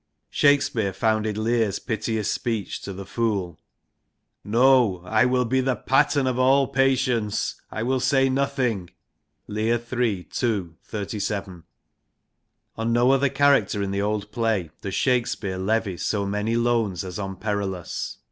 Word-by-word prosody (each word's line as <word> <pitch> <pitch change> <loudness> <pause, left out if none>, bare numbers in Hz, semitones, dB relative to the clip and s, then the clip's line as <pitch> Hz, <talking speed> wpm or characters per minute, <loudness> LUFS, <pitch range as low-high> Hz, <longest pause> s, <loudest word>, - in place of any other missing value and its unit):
Shakespeare 130 -8 +2
founded 110 +1 0
Lear's 110 -2 +1
piteous 110 -2 -2
speech 115 -4 -3
to 100 - -6
the 95 0 -7
Fool 100 -6 -2 0.4
< - - -53
No 125 -8 +4
I 110 +5 +3
will 125 0 +2
be 130 +3 +1
the 130 -1 0
pattern 140 +1 +2
of 130 -1 0
all 135 +2 +4
patience, 130 -5 0
I 110 - -4
will 130 +2 +1
say 135 +1 +3
nothing 130 -8 -1 0.3
' - - -51
(Lear, 110 +3 0 0.2
III. 115 -8 0
ii. 110 -6 +1 0.2
37). 100 -4 -4 1.1
On 115 +1 -1
no 120 +2 +4
other 135 0 +3
character 135 -8 +3
in 100 - -2
the 100 0 -1
old 105 0 -2
play 110 -8 -1
does 95 -2 -4
Shakespeare 120 -8 0
levy 100 -1 0
so 100 +5 -1
many 105 +3 -1
loans 115 -6 +1
as 90 -1 -6
on 95 -1 -4
Perillus. 100 -3 -3
110 Hz, 145 wpm, -24 LUFS, 100-130 Hz, 1.1 s, No